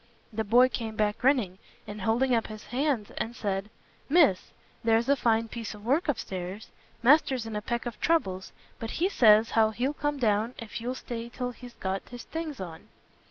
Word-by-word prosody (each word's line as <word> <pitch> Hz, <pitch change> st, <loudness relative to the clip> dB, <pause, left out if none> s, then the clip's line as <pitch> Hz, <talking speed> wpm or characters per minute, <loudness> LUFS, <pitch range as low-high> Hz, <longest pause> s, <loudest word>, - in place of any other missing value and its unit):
The 220 Hz, +1 st, -1 dB
boy 240 Hz, +4 st, +6 dB
came 225 Hz, -4 st, -4 dB
back 210 Hz, -1 st, 0 dB
grinning, 240 Hz, -9 st, +2 dB, 0.3 s
and 210 Hz, 0 st, -7 dB
holding 240 Hz, +5 st, +2 dB
up 230 Hz, -1 st, +1 dB
his 215 Hz, -1 st, -9 dB
hands, 255 Hz, -5 st, -1 dB
and 235 Hz, +1 st, -3 dB
said, 195 Hz, -1 st, -2 dB, 0.4 s
"Miss, 290 Hz, -, +4 dB, 0.3 s
there's 230 Hz, +1 st, +3 dB
a 280 Hz, -, +5 dB
fine 230 Hz, -3 st, +2 dB
piece 225 Hz, -1 st, -6 dB
of 210 Hz, 0 st, -13 dB
work 285 Hz, +9 st, +2 dB
upstairs! 195 Hz, -6 st, -4 dB, 0.3 s
Master's 260 Hz, -2 st, +4 dB
in 225 Hz, -1 st, -5 dB
a 210 Hz, -, -2 dB
peck 235 Hz, +3 st, -3 dB
of 240 Hz, -2 st, -5 dB
troubles; 190 Hz, -, 0 dB, 0.3 s
but 225 Hz, -, -4 dB
he 350 Hz, -, +3 dB
says 220 Hz, -, +5 dB
how 220 Hz, -1 st, +4 dB
he'll 245 Hz, +6 st, -1 dB
come 290 Hz, 0 st, -2 dB
down, 225 Hz, -1 st, +1 dB
if 230 Hz, 0 st, -7 dB
you'll 250 Hz, +2 st, -3 dB
stay 235 Hz, -2 st, -6 dB
till 250 Hz, +1 st, -4 dB
he's 245 Hz, 0 st, -12 dB
got 190 Hz, 0 st, -4 dB
his 245 Hz, -1 st, -8 dB
things 320 Hz, -4 st, -5 dB
on." 170 Hz, -4 st, -8 dB
230 Hz, 190 wpm, -28 LUFS, 210-255 Hz, 0.4 s, boy